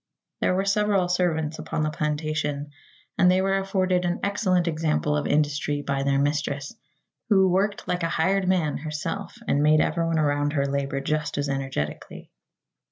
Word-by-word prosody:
There 185 - +1
were 195 +1 0
several 200 -2 +2
servants 165 -3 0
upon 155 - -2
the 155 - 0
plantation, 150 -1 -2 0.5
and 180 - +6
they 185 +1 +4
were 195 +1 +1
afforded 185 -2 0
an 175 0 -1
excellent 185 -3 +1
example 155 -2 0
of 150 - -1
industry 145 0 0
by 140 -1 -1
their 140 0 +1
mistress, 145 +1 -1 0.6
who 190 -3 +5
"worked 195 +3 0
like 180 0 -1
a 165 - 0
hired 190 +4 +1
man" 175 -5 +1
herself 155 +8 -5
and 145 - +2
made 155 +1 +5
everyone 165 +1 +1
around 145 -1 +1
her 140 -2 +1
labor 140 0 -2
just 155 +1 -2
as 145 0 -1
energetically. 135 - -4
155 Hz, 165 wpm, -25 LUFS, 145-185 Hz, 0.6 s, and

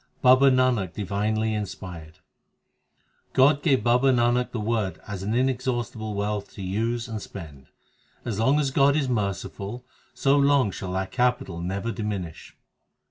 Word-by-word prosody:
Baba 130 +2 +7
Nanak 130 -8 +2
divinely 110 +2 -1
inspired: 90 -6 -6 1.2
God 140 +2 +4
gave 135 -9 +2
Baba 125 +3 +4
Nanak 120 0 +2
the 120 - -3
Word 105 -3 -1
as 100 -3 -6
an 105 +4 -2
inexhaustible 120 -4 -1
wealth 105 0 -2
to 100 - -7
use 115 +5 -2
and 110 -2 -5
spend; 75 -11 -10 0.6
As 110 -4 -3
long 135 +6 +3
as 140 -3 0
God 140 +1 +4
is 145 -3 +1
merciful, 105 +1 -3 0.3
so 135 +1 +3
long 140 -6 +3
shall 90 0 -6
that 95 0 -2
capital 125 -9 0
never 100 +6 -3
diminish. 100 -8 -5
110 Hz, 140 wpm, -25 LUFS, 100-130 Hz, 1.2 s, Baba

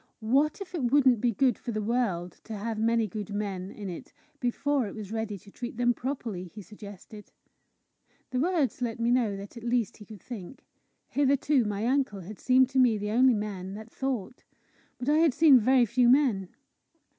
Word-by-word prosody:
"What 280 - +2
if 380 - -8
it 270 -9 0
wouldn't 260 -6 +4
be 245 - +2
good 250 +2 +1
for 240 - -5
the 215 - -2
world 205 -6 -2
to 220 - -6
have 215 +1 -4
many 230 0 +2
good 210 0 -6
men 195 -3 -3
in 205 -1 -8
it 175 -3 -8 0.3
before 265 +1 0
it - - -8
was 210 -2 -7
ready 220 -2 -3
to 200 +2 -17
treat 240 0 -7
them 245 0 +3
properly?" 240 -8 -4
he 205 +4 -11
suggested. 205 +1 -12 1.0
The 255 - -1
words 315 -5 0
let 235 -2 -2
me 230 +1 +1
know 230 -5 +1
that 200 +4 -10
at 230 - -9
least 235 -2 0
he 210 - -12
could 210 -5 -12
think. 225 -1 -9 0.4
Hitherto 280 -2 +2
my 210 +1 -2
uncle 255 -6 0
had 195 +4 -10
seemed 255 0 +4
to 265 0 +1
me 240 -4 +4
the 210 0 -3
only 250 +2 +5
man 200 -2 -5
that 220 +2 -10
thought. 255 -4 -4 0.5
But 250 - -6
I 300 +2 +4
had 320 -5 +3
seen 295 -4 +7
very 250 +2 +4
few 240 +2 +3
men. 245 -9 +3
230 Hz, 195 wpm, -28 LUFS, 210-260 Hz, 1.0 s, seen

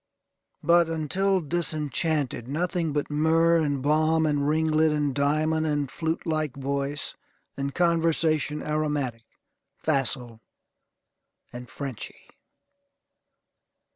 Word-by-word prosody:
But, 170 -1 +4
until 185 +5 +1
disenchanted, 155 -5 -1
nothing 170 +3 -1
but 145 0 -2
myrrh, 165 +2 +3
and 145 -4 0
balm, 155 +2 +3
and 145 -2 +1
ringlet, 155 0 +3
and 150 -2 0
diamond, 155 +3 +1
and 145 -3 -1
flute 160 0 -2
like 155 -4 -1
voice, 140 +1 -3 0.4
and 140 0 -4
conversation 165 -3 +1
aromatic, 150 -6 -2 0.6
facile, 130 -6 0 1.1
and 120 0 -8
Frenchy. 135 -4 -7
150 Hz, 95 wpm, -26 LUFS, 140-160 Hz, 1.1 s, But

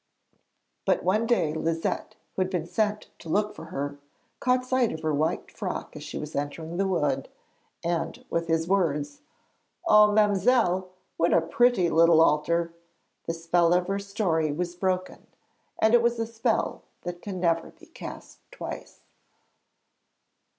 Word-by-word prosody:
But - - +1
one 215 +5 +2
day 165 -11 +2
Liset, 165 +1 -2 0.2
who - - 0
had 185 - +1
been 180 -4 -2
sent 210 +4 -1
to 165 - -10
look 210 +5 +1
for - - -10
her, 145 +1 -4 0.4
caught 255 0 +2
sight 255 -2 +2
of 160 - -6
her 155 -1 0
white 155 +3 -1
frock - - -5
as - - -8
she - - -6
was 150 0 -6
entering 160 +4 -4
the 195 0 +1
wood. 145 -7 0 0.5
And 170 -1 -2
with 170 0 0
his 165 0 +1
words: 180 - 0 0.6
'Oh, 210 0 +7
ma'mselle, 205 -2 +3 0.3
what 170 - +2
a 170 - +5
pretty 180 +2 +3
little 165 0 +6
altar!' 165 +2 +2 0.5
the 165 - 0
spell 170 +1 +3
of 180 0 +2
her 200 0 0
story 195 -6 0
was 175 +3 -3
broken, 185 0 -2 0.5
and 220 +1 +4
it 240 -1 +6
is 235 0 +2
a 225 - -1
spell 230 0 -1 0.2
that 175 0 -6
can 195 -3 -5
never 165 -2 +1
be 335 +1 -18
cast 330 - -10
twice. - - -8
175 Hz, 155 wpm, -27 LUFS, 165-210 Hz, 0.6 s, Oh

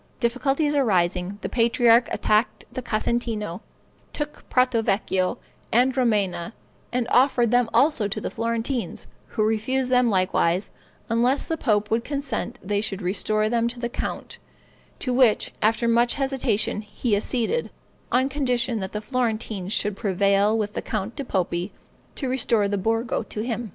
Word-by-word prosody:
Difficulties 270 +5 +1
arising, 190 -7 +1
the - - -1
patriarch 235 0 +4
attacked 215 +3 +1
the 255 - -3
Casentino, 215 -5 -2 0.5
took 295 0 -6
Prato 250 -2 +3
Vecchio, 195 -1 0 0.3
and 250 +3 +3
Romena, 210 -6 0 0.4
and 245 -1 0
offered 245 -3 +4
them 245 -2 +3
also 275 -8 +3
to 205 - -3
the - - -4
Florentines, 230 +2 -2 0.2
who 215 - -1
refused 250 +4 0
them 250 -1 +4
likewise, 185 -1 +1 0.4
unless 245 +5 +1
the 325 - -1
pope 215 -8 0
would 230 +1 +1
consent 280 -3 -3
they 205 +1 0
should 200 -2 -3
restore 215 +3 0
them 230 +1 +1
to 240 +1 -6
the 235 0 -2
count, - - -5 0.6
to 255 - -2
which, 245 -4 +3
after 225 +2 +2
much 235 +1 +3
hesitation, 265 -7 0
he 210 +1 -1
acceded, 245 - -1 0.4
on 260 +2 +3
condition 250 -4 0
that 190 -1 -5
the 210 - -3
Florentines 220 -5 -2
should 210 -1 0
prevail 200 +1 +2
with 210 -1 -2
the - - -3
Count 215 +1 -4
di 280 - -4
Poppi 180 -4 -1 0.4
to 270 - -3
restore 235 -5 +2
the 205 - -1
Borgo 225 +3 0
to 215 -1 -6
him. 235 -1 -3
230 Hz, 150 wpm, -24 LUFS, 210-250 Hz, 0.6 s, patriarch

